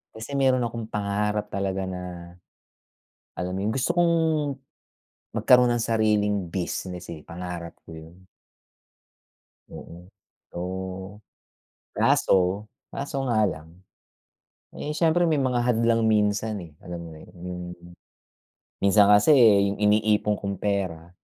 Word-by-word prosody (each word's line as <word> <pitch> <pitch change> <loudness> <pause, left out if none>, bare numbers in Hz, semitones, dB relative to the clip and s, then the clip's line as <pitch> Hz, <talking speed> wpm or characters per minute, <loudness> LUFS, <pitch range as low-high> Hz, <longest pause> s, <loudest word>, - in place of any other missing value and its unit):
Kasi 110 +5 -8
meron 130 -2 +3
akong 115 -1 -4
pangarap 105 0 -2
talaga 95 -1 -2
na, 90 -1 -7 1.0
alam 90 +1 -4
mo - - -3
yung, 110 - -1
gusto 135 +5 -1
kong 170 -1 +4 1.2
magkaroon 125 -1 +5
ng 120 -1 0
sariling 105 -2 +2
business, 90 0 -4
eh, 80 - -10
pangarap 85 -1 -7
ko - - -12
yun. 85 +4 -14 1.4
Oo. 85 +1 -11 0.5
Oo, 95 +2 -6 0.8
kaso, 95 +3 +2 0.2
kaso 140 -1 -3
nga 120 -4 +1
lang, 80 -2 -8 1.0
eh, 150 - -4
siyempre, 165 +2 +2
may 160 -4 +2
mga 125 -2 +1
hadlang 115 -1 +2
minsan, 105 0 +1
eh, 85 -4 -11
alam 90 -1 -6
mo 85 -1 -8
na 80 - -13
yun? - - -17
Yung 90 0 -5 1.2
minsan 100 +1 +5
kasi 105 +9 +6
yung 100 -6 +5
iniipon 105 0 +2
kong 100 -1 -4
pera, 95 -5 -2
105 Hz, 120 wpm, -25 LUFS, 90-115 Hz, 1.4 s, kasi